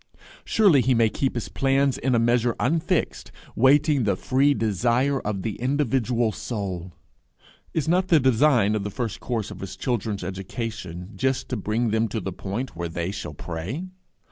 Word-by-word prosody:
Surely 190 -11 +4
he 130 0 +2
may 115 -1 +4
keep 135 +4 -1
his 120 - -3
plans 135 0 +1
in 130 -1 0
a - - +4
measure 120 +1 +2
unfixed, 160 +5 0 0.2
waiting 140 +2 +4
the 100 -3 +2
free 135 +8 +2
desire 120 +6 +1
of 100 -3 -3
the 110 - -3
individual 125 -3 +1
soul! 100 -6 -5 0.8
Is 160 -1 0
not 180 +3 +2
the 165 -3 +5
design 125 -4 +3
of 105 -2 -1
the 105 - -3
first 115 0 -4
course 115 -5 -3
of - - -9
his 95 -1 -6
children's 105 -3 -2
education 95 -1 -5
just 130 0 -1
to 125 - -1
bring 110 +2 -1
them 110 +1 +2
to 110 - -3
the 95 -2 -5
point 105 +9 -5
where 85 0 -4
they 85 +2 -3
shall 85 -7 -6
pray? 95 - -5
115 Hz, 170 wpm, -24 LUFS, 100-135 Hz, 0.8 s, the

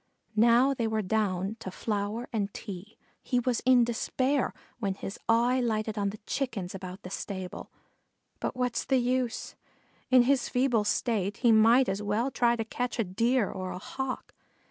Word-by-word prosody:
Now 235 +5 +5
they 235 -4 -1
were 220 -1 0
down 195 0 0
to 190 - -6
flour 210 +4 -3
and 205 -3 -1
tea. 200 0 -8 0.2
He 250 - 0
was 245 -1 0
in 250 -2 +7
despair, 255 +3 0 0.3
when 200 -4 -1
his 195 0 -7
eye 240 +3 +4
lighted 220 -2 -1
on 200 -2 0
the 210 - -7
Chickens 225 -10 -3
about 185 0 -8
the 180 - -8
stable; 190 -2 -5 0.7
but - - -3
what's 250 -2 -1
the 265 - +2
use? 250 -1 -1 0.6
In 255 -1 +7
his 265 0 +2
feeble 245 -4 +2
state 205 -3 0
he 235 - +7
might 230 +4 +6
as 195 +2 -1
well 210 +6 0
try 240 -1 +3
to 225 -1 -3
catch 245 +2 -3
a 230 - +2
Deer 230 +4 +1
or 185 -1 -5
a - - -5
Hawk. 265 +7 -5
225 Hz, 170 wpm, -29 LUFS, 200-250 Hz, 0.7 s, in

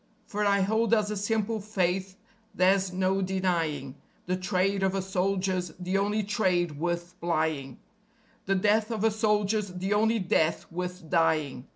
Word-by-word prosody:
For 210 0 -2
I 200 -1 +3
hold 220 +3 +2
as 210 -1 0
a - - -2
simple 220 +2 -1
faith 190 -2 -1 0.4
there's 190 +1 +3
no 190 +1 +1
denying: 170 -8 -1 0.3
The 180 - 0
trade 190 +1 0
of 190 0 +1
a 195 - 0
soldier's 185 -2 -1
the 185 +2 0
only 210 +2 0
trade 180 -7 0
worth 175 +1 -2
plying; 155 -6 -1 0.7
The 195 - +2
death 210 +3 +2
of 220 -3 -2
a 225 - +4
soldier's 210 -1 +1
the 185 +2 -2
only 220 +2 +3
death 170 -4 +1
worth 180 0 -5
dying. 155 -6 +1
190 Hz, 155 wpm, -28 LUFS, 175-205 Hz, 0.7 s, a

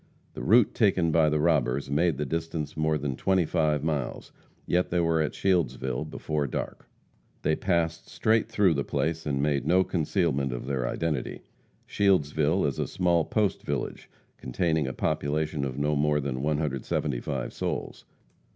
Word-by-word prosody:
The - - -7
route 115 +1 +4
taken 95 -7 +2
by 80 -1 +4
the 75 0 +1
robbers 70 -4 +1
made 80 0 +2
the 75 - -2
distance 80 0 -3
more 80 0 +1
than 70 -2 -3
twenty 95 +3 +2
five 75 -3 +1
miles; 75 -5 -3 0.3
yet 90 +1 +1
they 90 - +1
were 80 -1 +2
at 75 - -2
Shieldsville 65 -9 0
before 75 -2 -2
dark. - - -5 0.5
They 80 - +2
passed 85 -3 -1
straight 110 +1 +1
through 105 -6 +3
the 70 -2 -1
place 80 +2 -2
and 70 -1 0
made 75 -2 0
no 90 +2 +4
concealment 80 -6 0
of - - -5
their 65 -2 -1
identity. 75 -2 -3 0.4
Shieldsville 80 -3 +2
is 70 - -2
a - - 0
small 85 -3 +1
post 105 -4 0
village, - - -4 0.3
containing 80 +2 0
a 65 - -3
population 75 0 -1
of 65 -1 -3
no 75 +1 +1
more 75 +1 +2
than 65 -2 -3
175 70 -3 -2
souls. - - -4
75 Hz, 160 wpm, -27 LUFS, 70-85 Hz, 0.5 s, route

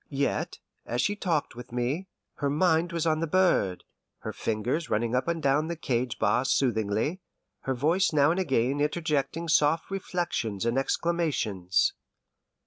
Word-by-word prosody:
Yet, 140 -1 -1 0.3
as 120 - -2
she 205 +10 +1
talked 170 - -1
with 120 0 -10
me, 125 +10 -2 0.3
her 140 - 0
mind 165 +3 +2
was 170 -1 -1
on 155 -1 +2
the 165 - -1
bird, 165 - +2 0.4
her - - -5
fingers 120 +9 -2
running 115 +2 0
up 125 +3 +1
and 170 -1 -1
down 145 +3 +2
the 170 - -3
cage 125 -6 -1
bars 110 +5 +1
soothingly, 115 - +1 0.5
her 130 - +1
voice 165 +9 +2
now 145 0 +4
and 175 - 0
again 135 -4 +1
interjecting 150 +1 -1
soft 155 +2 +2
reflections 170 - -2
and 120 +3 +2
exclamations. 135 - 0
145 Hz, 150 wpm, -28 LUFS, 120-170 Hz, 0.5 s, now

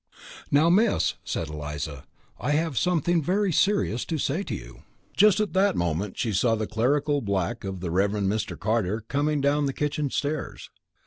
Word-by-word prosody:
"Now, 155 +4 +4
Miss," 210 +5 +3
said 80 - -3
Eliza. 75 -2 -6 0.3
"I 145 - 0
have 160 -1 0
something 175 +3 +2
very 190 +5 +1
serious 195 - +2
to 160 - -2
say 150 +5 -1
to - - -4
you - - -10 0.2
" - - -34
Just 210 -2 +5
at 210 -2 -1
that 195 +2 +3
moment 85 +3 -2
she 115 -4 -1
saw 115 +4 +2
the 110 0 -2
clerical 140 +7 +1
black 100 +2 -2
of 95 -2 -5
the 90 -3 -3
Reverend 100 +2 +1
Mr. 110 +2 -2
Carter 110 0 0
coming 145 +5 0
down 145 +1 +2
the 135 - -2
kitchen 150 0 -1
stairs. 145 +3 -3
135 Hz, 180 wpm, -26 LUFS, 100-155 Hz, 0.3 s, Just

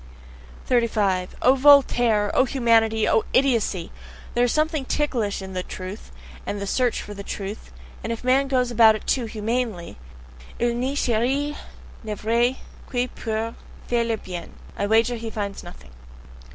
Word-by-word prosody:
35. 210 -7 +1
O 255 - +6
Voltaire! 245 -6 +4
O 260 - +4
humanity! 225 -4 +2
O 220 - +3
idiocy! 230 -10 +1 0.4
There 240 +1 +3
is 245 - 0
something 310 -1 0
ticklish 240 -9 -1
in 190 0 -8
"the 185 - -2
truth," 185 +3 -8 0.3
and - - -4
in - - -5
the 200 - -3
SEARCH 245 +4 0
for 205 - -8
the 200 - -8
truth; 200 +1 -6 0.3
and 225 - -3
if 230 - -5
man 265 +2 +3
goes 250 -2 +1
about 225 -2 +6
it 215 - -8
too 250 -3 0
humanely 220 - -3 0.6
"il 240 0 +1
ne 255 +4 -2
cherche 270 +4 0 0.5
le 215 -1 -4
vrai 235 +4 +1 0.3
que 250 0 -1
pour 225 0 -3 0.3
faire 240 -1 +1
le 230 -1 -1
bien" 180 -4 -8 0.2
I 200 - -1
wager 230 +3 +3
he 225 0 -5
finds 205 -2 -4
nothing! 65 +1 -13
230 Hz, 160 wpm, -23 LUFS, 210-250 Hz, 0.6 s, O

